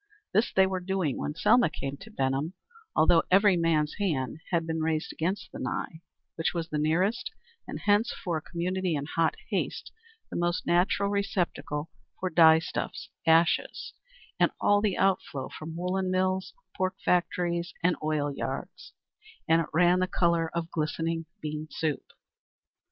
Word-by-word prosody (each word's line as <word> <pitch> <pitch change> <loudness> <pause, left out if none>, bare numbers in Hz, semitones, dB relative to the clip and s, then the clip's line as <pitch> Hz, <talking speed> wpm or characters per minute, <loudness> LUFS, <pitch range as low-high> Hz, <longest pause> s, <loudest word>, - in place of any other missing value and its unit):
This 215 +5 +3
they 190 - +5
were 190 -1 -1
doing 180 -6 -1
when 150 - -3
Selma 240 +5 +4
came 140 -2 -5
to 195 - -12
Benham, 135 -2 -1 0.4
although 165 +1 +5
every 195 +1 +5
man's 160 -3 +1
hand 155 -7 -1
had 170 -2 +1
been 160 0 -2
raised 155 -1 -1
against 190 +3 -2
the - - -8
Nye, 145 +6 -4 0.4
which 165 +2 -1
was 165 -1 -2
the 150 - -1
nearest, 185 +10 +1 0.4
and - - -6
hence 210 +3 +3
for 175 -6 -3
a - - -5
community 180 +1 -2
in 140 -1 -2
hot 160 +1 +1 0.2
haste, - - -2 0.4
the - - -5
most 175 0 0
natural 180 +3 +2
receptacle 175 -6 -2 0.3
for 185 -1 -2
dyestuffs, 160 0 +3 0.2
ashes 165 +1 +2 0.5
and - - +5
all 205 0 +4
the 205 -3 0
outflow 180 -8 0
from 160 +1 -8
woollen 185 +2 -1
mills, 185 0 0 0.2
pork 185 0 -1
factories 175 -1 +1
and 180 0 +3
oil 150 -2 0
yards, - - -5 0.5
and 165 +1 +4
it 165 - -4
ran 175 +2 +4
the 185 - +1
color 170 -2 +1
of 170 0 -3
glistening 165 +1 -2 0.2
bean 155 0 -4
soup. 155 -3 -2
170 Hz, 155 wpm, -28 LUFS, 155-185 Hz, 0.5 s, they